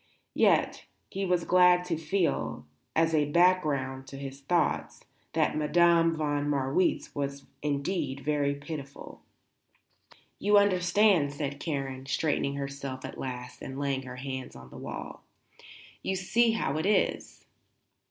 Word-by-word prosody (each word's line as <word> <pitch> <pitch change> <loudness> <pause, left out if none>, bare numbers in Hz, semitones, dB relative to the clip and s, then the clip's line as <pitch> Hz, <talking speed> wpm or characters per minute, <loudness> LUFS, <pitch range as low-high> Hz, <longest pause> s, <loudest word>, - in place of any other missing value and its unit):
Yet - - +2 0.3
he 195 0 -2
was 180 -1 +1
glad 180 0 +5
to 175 -2 -1
feel, 160 - -1 0.3
as 165 0 +3
a 150 -2 +2
background 145 -6 +2
to 135 - -9
his 135 0 -7
thoughts, 165 +2 0 0.3
that - - +1
Madame 165 +2 +4
von 145 -2 -1
Marwitz 140 +5 0
was 140 -1 -4 0.2
indeed 140 -1 -2
very 145 -1 0
pitiful. 140 -1 -8 1.2
"You 205 0 +4
understand," 185 -5 +3
said 145 -1 -4
Karen, 135 -4 -4
straightening 145 -1 0
herself 140 -1 -5
at - - -8
last 125 -1 -6
and 135 0 -7
laying 140 -1 -1
her 125 -1 -8
hands 130 0 -6
on 65 0 -12
the - - -12
wall. - - -7 0.8
"You 190 - -1
see 225 +5 +2
how 155 -9 -1
it 165 - -1
is." 210 - 0
145 Hz, 135 wpm, -29 LUFS, 140-175 Hz, 1.2 s, glad